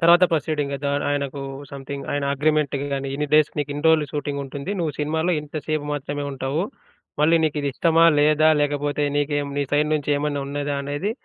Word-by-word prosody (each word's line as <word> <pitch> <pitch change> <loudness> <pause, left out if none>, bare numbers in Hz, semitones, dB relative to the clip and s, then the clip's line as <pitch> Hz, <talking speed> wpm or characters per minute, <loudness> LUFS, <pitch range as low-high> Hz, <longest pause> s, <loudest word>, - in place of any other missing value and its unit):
తర్వాత 170 +2 +7
ప్రొసీడింగ్ 150 -2 -1
అద 145 - -5 0.2
ఆయనకు 140 -1 -2 0.3
సమ్‌థింగ్ 140 0 -6
ఆయన 145 0 -1
అగ్రీమెంటికి 145 -1 +1
గాని, 135 0 -2
ఇన్ని 150 +1 -1
డేస్ 155 -1 +5
నీకిన్ని 145 0 -3
రోజులు 160 -2 +5
షూటింగ్ 145 -1 -3
ఉంటుంది. 140 +6 -6
నువ్వు 160 -4 -1
సినిమాలో 160 +4 0
ఇంతసేపు 150 0 -3
మాత్రమే 145 0 -3
ఉంటావు. 135 +5 -2 0.6
మళ్ళీ 165 +2 +5
నీకిది 145 -2 -1
ఇష్టమా? 165 +3 +3
లేదా? 155 +1 +4
లేకపోతే 145 0 0
నీకెం 145 0 0
నీ 145 - +1
సైడ్ 150 +1 +3
నుంచి 150 -1 -1
ఏమన్నా 145 -1 -1
ఉన్నదా? 145 +1 -2
అనేది 145 +8 -2
145 Hz, 165 wpm, -23 LUFS, 140-155 Hz, 0.6 s, తర్వాత